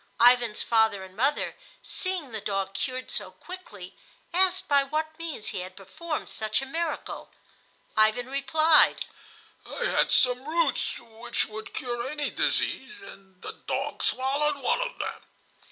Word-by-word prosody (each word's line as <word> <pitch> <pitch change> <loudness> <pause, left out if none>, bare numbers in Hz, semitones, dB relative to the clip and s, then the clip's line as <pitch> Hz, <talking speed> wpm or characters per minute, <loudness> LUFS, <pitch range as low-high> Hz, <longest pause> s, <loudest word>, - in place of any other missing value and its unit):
Ivan's 240 -2 +5
father 220 -4 +3
and 190 0 -12
mother, 275 +7 +1 0.3
seeing 370 -8 -2
the 220 -2 -4
dog 195 -1 -1
cured 255 +6 -3
so - - +1
quickly, 210 - -10 0.4
asked 375 +1 +3
by 285 -1 +5
what 310 +3 -2
means 310 -10 -4
he - - -3
had 185 +1 -7
performed 305 - -5
such 215 0 0
a 270 - -4
miracle. 320 +3 -3 0.7
Ivan 220 +3 +4
replied: 300 +4 +4 0.6
"I - - -4
had - - +2
some 250 0 +3
roots 325 -2 +1
which 230 +1 -3
would 220 0 -8
cure 240 0 -2
any 295 0 -2
disease, 425 - 0
and 190 - -14
the - - -4 0.2
dog - - -2
swallowed 285 +3 +1
one 280 - +1
of - - -3
them." - - -4
255 Hz, 145 wpm, -27 LUFS, 220-310 Hz, 0.7 s, Ivan's